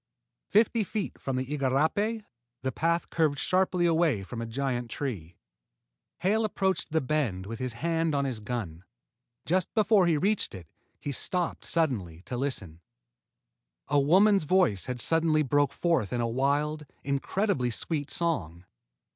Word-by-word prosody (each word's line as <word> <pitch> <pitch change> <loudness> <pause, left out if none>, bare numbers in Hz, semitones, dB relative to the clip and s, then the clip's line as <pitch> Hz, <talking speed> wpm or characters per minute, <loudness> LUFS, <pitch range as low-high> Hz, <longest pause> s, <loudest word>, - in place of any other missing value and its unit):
Fifty 220 +1 +3
feet 205 +1 -4
from 135 - -2
the 130 0 -1
igarapé, 150 - 0 0.4
the 130 - 0
path 170 +6 0
curved 155 -3 +2
sharply 185 +1 +1
away 160 - +2
from 115 +4 -6
a 115 - -4
giant 125 0 -2
tree. 100 - -5 0.8
Hale 215 +4 +2
approached 190 -3 0
the 160 - +2
bend 130 -10 -1
with 115 +4 -6
his 130 -2 -3
hand 165 +4 0
on 140 0 +1
his 130 -5 -3
gun. 105 -7 -5 0.6
Just 180 +1 +1
before 210 -4 +4
he 165 -3 +3
reached 200 - 0
it, 90 -3 -9 0.3
he 145 - -4
stopped 175 +5 -2
suddenly 100 - -1
to 125 - -5
listen. 105 - -3 1.1
A 145 0 +4
woman's 190 +6 +4
voice 160 - +2
had 125 -1 -3
suddenly 160 +4 +3
broken 145 +1 +1
forth 165 - +1
in 125 - -1
a 120 - +1
wild, 145 +5 0 0.2
incredibly 140 - 0
sweet 145 +5 -2
song. 90 - -2
145 Hz, 145 wpm, -28 LUFS, 120-170 Hz, 1.1 s, before